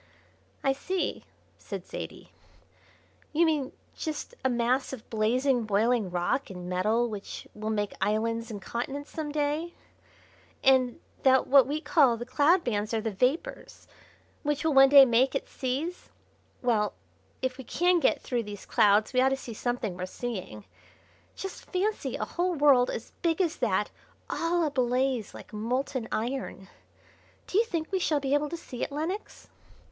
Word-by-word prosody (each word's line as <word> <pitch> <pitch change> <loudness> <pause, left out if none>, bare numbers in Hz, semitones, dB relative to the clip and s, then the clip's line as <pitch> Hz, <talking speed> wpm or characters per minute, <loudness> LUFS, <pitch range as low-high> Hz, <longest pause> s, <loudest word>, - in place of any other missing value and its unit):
"I 270 - +3
see," 370 +7 -3 0.3
said - - -7
Zaidie, - - -8 1.0
"you 335 +3 +4
mean 300 -5 0 0.2
just 315 +9 -5
a 260 - +3
mass 245 +3 +1
of 245 -3 -8
blazing, 240 +3 +2
boiling 215 0 +2
rock 175 +10 -1
and 180 -2 -7
metal 215 +7 +1
which 210 -3 -7
will 215 +1 -4
make 205 -2 -1
islands 230 +3 0
and 210 -3 -5
continents 270 +8 -5
some 310 -2 -4
day; 300 +3 -1 0.9
and 260 -2 +4 0.2
that 260 -1 +5
what 270 -2 +6
we 300 +2 -2
call 290 -6 +4
the 240 - -6
cloud 295 +8 +3
bands 215 -1 -1
are - - +1
the 225 - -2
vapours 265 - -2 0.5
which 295 0 -1
will 320 -1 +2
one 270 0 +8
day 280 -1 +10
make 250 +2 +3
its - - -3
seas. 280 +7 -3 0.5
Well, 220 -4 +2 0.5
if 260 0 -2
we - - -6
can 355 +7 +2
get - - +2
through 245 -3 -1
these 205 -2 -8
clouds 210 +3 +3
we 255 - +4
ought 265 - +5
to 270 - 0
see 240 -3 -8
something 230 -4 -2
worth 185 +1 -5
seeing. 185 - -6 0.7
Just 385 - -7
fancy 405 +3 -1
a - - -2
whole 355 0 -1
world 275 -4 +5
as 230 - -5
big 330 -1 +1
as 345 -4 +1
that 210 -4 0 0.4
all 340 +1 +1
ablaze 255 -4 0
like - - -12
molten 245 +3 -2
iron! 230 -5 -3 0.8
Do 390 - +1
you 460 - +3
think 335 -6 -3
we 380 - +1
shall 310 -4 +1
be 275 0 -1
able 290 +1 +2
to 340 - -4
see 250 -7 -9
it, - - -2
Lenox?" 325 +8 -4
260 Hz, 160 wpm, -28 LUFS, 225-295 Hz, 1.0 s, day